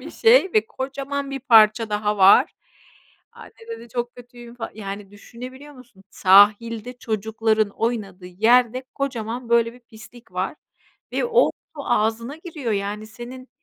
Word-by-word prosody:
bir - - -9
şey 455 -5 +4
ve 215 0 +3
kocaman 275 +2 -5
bir 275 -1 -5
parça 225 -3 +5
daha 210 0 -1
var. 200 - +6 0.8
"Anne" - - -14 0.2
dedi, 345 - -8
"Çok 240 +1 -4
kötüyüm 240 -1 -13
fal" 235 - -6
Yani, 200 -1 -7
düşünebiliyor 255 +7 -11
musun, 240 -7 -18
sahilde, 210 +5 +4
çocukların 220 -1 0
oynadığı 200 -6 -4
yerde, 240 +6 +2
kocaman 245 -3 -4
böyle 235 -1 +3
bir 245 - -17
pislik 230 -2 -16
var 185 +10 -3 0.6
ve - - 0
o 475 +1 +4 0.3
su 285 - -6
ağzına 225 +6 -1
giriyor, 310 - -5
yani, 205 +1 -3
senin. 250 +3 -10
230 Hz, 140 wpm, -22 LUFS, 215-255 Hz, 0.8 s, var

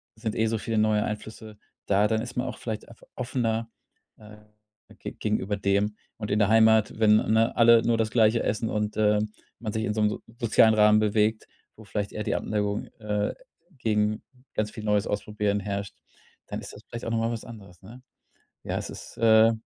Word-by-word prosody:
sind 110 -1 -4
eh 110 0 +1
so 110 0 0
viele 110 +1 -3
neue 110 -1 +3
Einflüsse 110 0 -7 0.3
da, 100 +1 +3
dann 110 0 0
ist 120 0 -7
man 125 +1 -1
auch - - -6
vielleicht 110 -2 -5
einfach 115 - -17
offener, 115 -2 -2 0.5
äh, 105 0 -14 0.6
ge - - -6
gegenüber 105 -1 -1
dem. 100 +1 +1 0.2
Und 105 -2 -5
in 105 - +2
der 105 - +4
Heimat, 110 -1 +4
wenn, 105 -1 +6
ne, 110 +2 +2
alle 115 -1 +6
nur 115 -1 +2
das 110 -1 0
Gleiche 115 -1 +3
essen 110 +1 -1
und, 105 0 -2
ähm, 105 0 +2 0.3
man 110 -3 -4
sich 110 0 -1
in 105 - -1
so 110 - -1
'nem 105 - +4
so - - -5 0.2
sozialen 110 -2 +5
Rahmen 105 0 +5
bewegt, 110 +1 +1 0.3
wo 110 - -14
vielleicht 105 -1 -3
eher 105 - -3
die - - -1
Abneigung, 105 -1 -1
äh, 105 -1 -1 0.4
gegen 105 -3 0 0.3
ganz 105 0 -1
viel 110 - -8
Neues 105 0 +1
ausprobieren 105 0 -1
herrscht, 100 0 -4 0.5
dann - - -5
ist - - -9
das - - -12
vielleicht 120 0 -7
auch 115 - -3
noch 115 - +1
mal 115 +1 0
was 115 - -5
anderes, 95 -6 -12
ne? 115 +7 -13 0.6
Ja, - - -3
es - - -5
ist, - - -10
äh 110 0 +6
110 Hz, 200 wpm, -26 LUFS, 105-115 Hz, 0.6 s, wenn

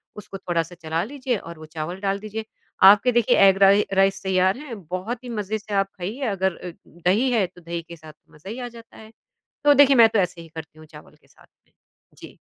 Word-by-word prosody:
उसको 200 -1 -9
थोड़ा-सा 175 -1 -3
चला 160 +2 -1
लीजिए 255 -1 -3
और 170 -3 -11
वो 155 - -10
चावल 160 +4 -6
डाल 195 0 -1
दीजिए। 215 +1 -6 0.5
आपके 230 +5 +3
देखिए 240 -2 +2
एग 195 0 +4
राइ 200 +2 +5
राइस 195 0 +2
तैयार 190 +2 +1
है, 270 -5 -8
बहुत 195 +7 -6
ही 245 - -8
मज़े 215 -1 -3
से 205 0 -9
आप 195 0 +1
खाइए। 205 +10 -6
अगर 190 -1 -1
अ, 180 - -8 0.2
दही 185 +10 0
है 220 -5 +2
तो 180 0 -19
दही 170 0 -5
के 170 - -8
साथ 155 -1 -14 0.2
मज़ा 155 +6 -13
ही 235 +4 -6
आ 245 - -5
जाता 230 -1 -14
है। 220 0 -14 0.5
तो 290 0 +6
देखिए 275 -1 +6
मैं 230 -1 +8
तो 220 - -1
ऐसे 180 -2 -1
ही 165 - -12
करती 160 -1 -11
हूँ 155 - -14
चावल 150 -1 -15
के - - -28
साथ - - -23 0.2
में। - - -36 0.5
जी। - - -13
195 Hz, 230 wpm, -23 LUFS, 170-225 Hz, 0.5 s, मैं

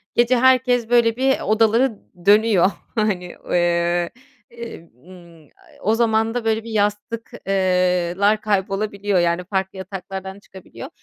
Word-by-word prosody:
gece 240 +1 +3
herkes, 250 -2 +3
böyle, 235 -2 +3
bir 265 +1 +1
odaları 225 +2 +2 0.3
dönüyor. 205 -2 +4 0.2
Hani, 190 -5 -1 0.2
eee, 175 0 +1 1.0
ımm, 170 -4 -16 0.2
a - - -22
e - - -21
o 215 +3 +1
zaman 225 -1 +1
da 240 -2 -3
böyle 220 0 0
bir 230 - -9
yastık 210 +2 -2 0.2
eee, 180 -2 +1
lar 210 +2 +2
kaybolabiliyor. 200 -1 -1
Yani, 170 +1 0
farklı 190 +1 -3
yataklardan 190 +1 -7
çıkabiliyor. 190 -2 -12
205 Hz, 130 wpm, -21 LUFS, 185-225 Hz, 1.0 s, dönüyor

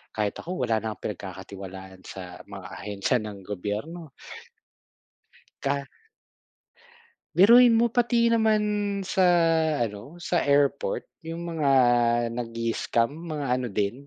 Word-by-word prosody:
kahit 105 -1 0
ako 175 -7 -4
wala 110 -2 +1
na 110 -1 -4
pinagkakatiwalaan 95 -1 -8
sa 90 -2 -9
mga 100 -2 -9
ahensiya 100 +4 -1
ng 105 -2 -7
gobyerno. 105 - -5 1.5
Ka 140 0 -1 1.5
Biruin 235 +5 +7
mo 235 +1 +4
pati 235 -1 +2
naman 220 -2 +3 0.4
sa 190 0 +1 0.6
ano, 110 +8 -5
sa 175 0 0
airport 145 - +1 0.2
yung 165 +1 -5
mga 155 -4 0 0.6
nag-i-scam 115 0 -1
mga 155 -2 -5
ano 125 -1 -3
din, 105 +8 -2
130 Hz, 105 wpm, -26 LUFS, -, 1.5 s, Biruin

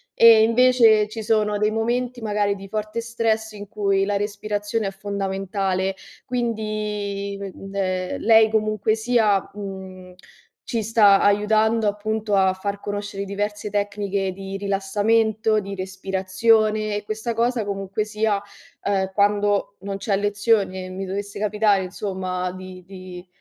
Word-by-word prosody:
e 225 -1 +8
invece 230 -2 +5
ci 220 0 -6
sono 210 -1 +1
dei 210 +1 +1
momenti, 240 +2 -1
magari 205 -2 0
di 195 0 -10
forte 215 +2 -3
stress 225 -1 -1
in 205 -1 -9
cui 195 -2 +1
la 205 0 -1
respirazione 205 +1 -2
è - - -3
fondamentale, 195 -1 -2 0.3
quindi, 210 -4 -3
uhm, 195 0 -8
ehm, 185 -2 -2
lei 220 -1 +5
comunque 215 -1 +1
sia, 220 -4 +2
mhmm, 190 -2 -8 0.5
ci 230 -3 -1
sta 205 -2 +5
aiutando 215 +2 +3
appunto 210 0 -1
a 190 -1 +4
far 200 +2 -4
conoscere 205 -1 -4
diverse 205 +1 -3
tecniche 200 -1 -1
di 195 +1 -7
rilassamento, 210 +2 +1
di 200 -1 -6
respirazione 195 +3 +1
e 210 - -3
questa 220 +3 -3
cosa 235 0 0
comunque 195 +1 -2
sia, 215 -1 0 0.4
uhm, 190 -1 0
quando 205 0 +1
non 195 0 -5
c'è 200 0 0
lezione, 200 -2 0
mi 190 +1 -5
dovesse 200 +2 -5
capitare, 210 -1 +2
insomma, 185 -1 -3
di 185 0 -10
di 185 -1 -10
205 Hz, 135 wpm, -23 LUFS, 195-220 Hz, 0.5 s, e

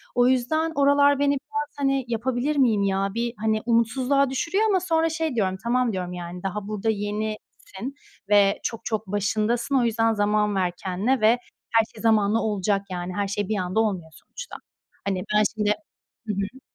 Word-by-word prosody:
O 245 0 +4
yüzden, 315 +6 +1
oralar 285 0 +4
beni 285 0 +3
biraz, 290 +1 -4
hani 275 -2 +1
"Yapabilir 245 +5 -1
miyim 225 -7 +3
ya?" 195 0 +1
bir, 235 +1 -2
hani, 215 0 0
umutsuzluğa 250 +4 +2
düşürüyor 335 +10 0
ama 380 - +3
sonra 330 -2 +1
şey 320 -4 -2
diyorum, 190 -4 0
"Tamam, 245 -1 +1
diyorum 180 -1 -3
yani, 175 +1 -7
daha 195 +1 -3
burada 215 +1 -2
yenisin 215 +3 -4 0.3
ve 205 -1 +4
çok, 230 - -4
çok 220 -2 -2
başındasın. 215 +6 0
O 255 - +4
yüzden, 225 -1 +2
zaman 210 0 +1
ver 185 -2 +1
kendine 200 +8 0
ve 215 - +5 0.4
her 225 -1 +4
şey 215 - -10
zamanla 220 -1 +3
olacak, 205 -2 0
yani. 180 0 -4
Her 200 -1 0
şey, 200 0 -2
bir 215 - 0
anda 185 +2 -1
olmuyor 185 -7 -1
sonuçta." - - -10 0.5
Hani 190 -2 -1
ben 210 - +5
şimdi 210 -1 +2 0.6
hı - - +1
hı. 200 +7 -4
220 Hz, 175 wpm, -24 LUFS, 200-260 Hz, 0.6 s, ve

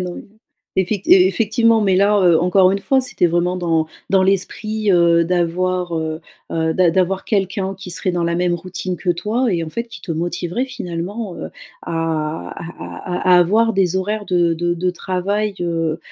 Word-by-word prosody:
non, 180 -1 -5 0.5
effect 190 +1 -1
effectivement. 220 +4 +4
Mais 195 -3 +2
là, 205 +2 +4
heu, 170 -2 +5
encore 185 +1 +4
une 195 - 0
fois, 265 +6 +2
c'était 250 -8 +1
vraiment 175 +2 0
dans 165 -3 0 0.2
dans 190 -1 +4
l'esprit, 205 +2 0
heu, 170 -1 +4
d'avoir, 180 +1 0
heu 160 0 -3 0.3
heu, 160 0 0
d'a 175 -2 +3
d'avoir 190 +1 0
quelqu'un 195 -2 -1
qui 185 -1 -9
serait 180 +1 -2
dans 175 -1 -1
la 170 0 0
même 175 -1 +1
routine 185 +1 -5
que 180 +1 -1
toi 215 +7 0
et 170 -2 0
heu, - - -4
en - - -5
fait, 235 +8 -5
qui 235 - -11
te 170 - -5
motiverait 175 +8 -2
finalement, 190 -2 -5
heu, - - -6 0.3
à - - -6 0.6
à 175 +1 -7
à 180 - +6
à - - +7
avoir 220 +6 +3
des 190 -2 +1
horaires 205 +3 -2
de 175 -3 +1
de 175 +1 -1
de 180 +1 -1
travail, 195 +3 -2
heu 165 -2 -1
180 Hz, 185 wpm, -19 LUFS, 175-200 Hz, 0.6 s, à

